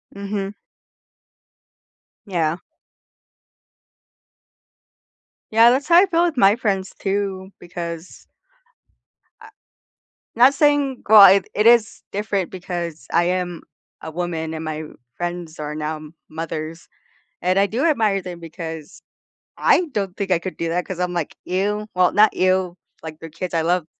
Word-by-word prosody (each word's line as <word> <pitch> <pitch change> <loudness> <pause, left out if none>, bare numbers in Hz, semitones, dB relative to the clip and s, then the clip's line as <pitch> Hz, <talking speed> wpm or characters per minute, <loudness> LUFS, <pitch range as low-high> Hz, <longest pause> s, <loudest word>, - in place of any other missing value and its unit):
Mhm. 200 0 -4 1.7
Yeah. 170 -4 -1 2.9
Yeah, 230 +2 +6
that's 280 +4 0
how 340 - +5
I 370 - +7
feel 340 -1 +2
with 330 -6 -2
my 200 -1 +5
friends 195 -5 -2
too, 195 -1 -2
because 170 -1 -8 1.1
I - - -13 0.9
not 255 +4 +6
saying 285 -3 +2
well, 205 -3 +10
it 200 - -2
it 210 +2 +1
is 235 -2 +4
different 200 -2 -2
because 175 -3 -6
I 170 - +3
am 180 -1 -2 0.4
a 160 - -6
woman 160 -1 -4
and 160 - -5
my 155 0 -4 0.3
friends 175 -2 -5
are 150 0 -5
now 155 0 -4 0.3
mothers, 160 +1 -6 0.5
and 185 +2 +2
I 200 - +4
do 240 +9 -2
admire 220 - +2
them 175 -2 -8
because 160 -2 -8 0.6
I - - +4
don't 195 -4 -2
think 195 -2 -3
I 175 - +3
could 185 +2 -7
do 165 0 -2
that 175 +1 -1
'cause 185 -2 -6
I'm 180 0 -1
like, 170 -4 -3
"Ew." 205 +3 -1
Well, 180 -1 +4
not 210 +1 +5
ew. 185 -1 +1 0.3
Like, 155 -1 -8
they're 165 - -9
kids, 175 +3 -6
I 165 - +1
love 170 0 0
185 Hz, 140 wpm, -21 LUFS, 165-205 Hz, 2.9 s, well